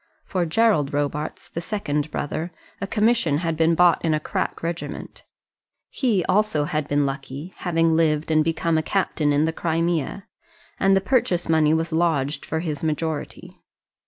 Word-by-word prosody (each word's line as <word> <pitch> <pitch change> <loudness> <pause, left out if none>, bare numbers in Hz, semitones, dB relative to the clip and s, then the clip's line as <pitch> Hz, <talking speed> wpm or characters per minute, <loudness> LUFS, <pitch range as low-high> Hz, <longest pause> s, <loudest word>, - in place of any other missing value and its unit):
For 180 -3 -1
Gerald 160 -6 +2
Robarts, 145 +1 -3
the 170 - -5
second 155 -6 -2
brother, 155 +4 -3 0.3
a 195 - -2
commission 215 -8 +2
had 165 0 -1
been 165 +1 +3
bought 175 -1 +4
in 160 -2 +2
a - - 0
crack 150 - -3
regiment. 170 0 -5 0.7
He 220 -10 +1
also 190 -6 +2
had 150 0 -2
been 145 0 +2
lucky, 135 +5 -5
having 165 -2 +1
lived 160 -1 +1
and 155 0 +4
become 165 0 +1
a - - +1
captain 155 -4 0
in 145 +2 +3
the 160 - -1
Crimea; 165 +2 -1 0.5
and 195 0 +4
the - - +1
purchase 190 -6 +1
money 160 -1 +3
was 165 +1 -1
lodged 155 -4 0
for 160 +1 -2
his 155 -3 -4
majority. 155 -1 -3
160 Hz, 160 wpm, -23 LUFS, 150-175 Hz, 0.7 s, bought